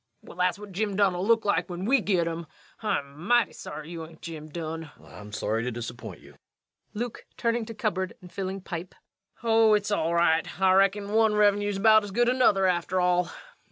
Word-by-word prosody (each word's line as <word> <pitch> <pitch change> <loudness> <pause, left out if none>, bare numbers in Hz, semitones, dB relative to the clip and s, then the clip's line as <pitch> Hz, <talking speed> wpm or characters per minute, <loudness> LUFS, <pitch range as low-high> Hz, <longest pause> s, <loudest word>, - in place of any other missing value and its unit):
Well, - - -12
that's 180 0 +2
what 205 -1 -10
Jim 205 +1 -2
Dunn'll 190 -1 +1
look 230 -1 +3
like 180 -4 +1
when 180 +1 -5
we 265 +2 +3
git 185 -5 +1
'im. 165 0 -4 0.3
I'm 145 -8 -3
mighty 240 +4 +3
sorry 155 +2 -8
you 165 -2 -6
hain't 160 0 -13
Jim 155 -2 -7
Dunn. 160 0 -5
REVENUE. - - -16
I'm 105 0 -10
sorry 110 +1 -1
to 125 - -2
disappoint 120 0 -7
you. - - -18 0.6
LUKE. 235 +2 -5
[Turning 230 -1 0
to 225 - -7
cupboard 190 -4 -2
and 180 -1 -14
filling 195 0 -4
pipe.] 175 0 -7 0.5
Oh, 225 -1 +5
it's 210 0 -1
all 170 -4 +1
right. 165 +1 +2
I 190 -1 +4
reckon 195 +1 +2
one 220 -1 +3
Revenue's 205 -1 +2
about 215 +1 +6
as 205 - -6
good 240 +5 +2
as 250 - +2
another, 200 -7 +4
after 180 0 +1
all. 180 -1 +2
190 Hz, 200 wpm, -27 LUFS, 170-210 Hz, 0.6 s, about